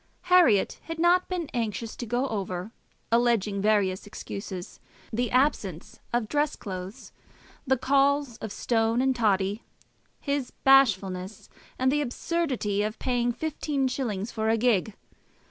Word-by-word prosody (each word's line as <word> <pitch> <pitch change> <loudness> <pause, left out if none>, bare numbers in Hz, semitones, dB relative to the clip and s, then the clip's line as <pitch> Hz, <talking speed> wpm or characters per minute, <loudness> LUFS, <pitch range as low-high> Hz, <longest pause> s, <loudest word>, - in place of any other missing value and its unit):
Herriot 275 - +5
had 330 0 -5
not 350 +2 +3
been 355 -4 -2
anxious 225 -2 -3
to 240 - -5
go 245 +4 0
over, 190 -1 -4 0.4
alleging 230 -4 +2
various 200 -2 +1
excuses, 195 -3 -7 0.3
the 240 +1 0
absence 225 - 0
of 240 -2 0
dress 295 +4 0
clothes, 190 +5 -7 0.6
the 265 +1 +3
calls 275 -1 +2
of 220 - -6
Stone 225 +2 +1
and 265 -1 +2
Toddy, 205 -2 +1 0.6
his 280 -3 -2
bashfulness, 195 -8 +3 0.3
and 260 0 +2
the 295 +1 +1
absurdity 255 -7 -1
of 215 +1 -2
paying 245 -2 0
fifteen 290 0 -2
shillings 230 -5 -3
for 220 -1 -1
a 225 - +3
gig. 220 -3 +1
235 Hz, 130 wpm, -27 LUFS, 205-270 Hz, 0.6 s, Herriot